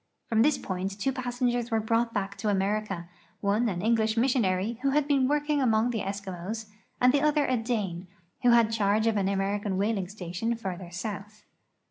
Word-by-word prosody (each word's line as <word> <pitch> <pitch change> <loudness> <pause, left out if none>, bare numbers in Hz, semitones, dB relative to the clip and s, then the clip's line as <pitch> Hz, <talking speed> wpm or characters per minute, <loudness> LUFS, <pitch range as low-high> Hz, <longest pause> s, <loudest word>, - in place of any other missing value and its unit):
From 225 -1 +3
this 295 +4 +4
point 190 +2 -4
two 270 - +1
passengers 245 -2 -1
were 225 -2 +1
brought 230 +2 +1
back 200 -2 -3
to 210 +2 -1
America, 195 -2 -1 0.3
one 215 +4 +1
an 180 -2 -3
English 220 0 +2
mis 250 +2 +3
sionary, 210 0 0
who 275 +2 +1
had 290 +1 +2
been 275 -3 +3
working 295 0 +1
among 230 -1 +2
the 225 - -2
Eskimos, 195 +2 -5 0.3
and 250 +1 +5
the 285 - +3
other 300 -1 +3
a 255 - +1
Dane, 210 -7 -2 0.3
who 245 - +4
had 235 -2 +5
charge 215 0 +2
of 225 -1 +2
an 195 -2 +1
American 200 0 -1
whaling 200 -2 0
station 195 +4 -3
farther 190 -5 -6
south. 210 +3 -6
220 Hz, 185 wpm, -28 LUFS, 195-240 Hz, 0.3 s, and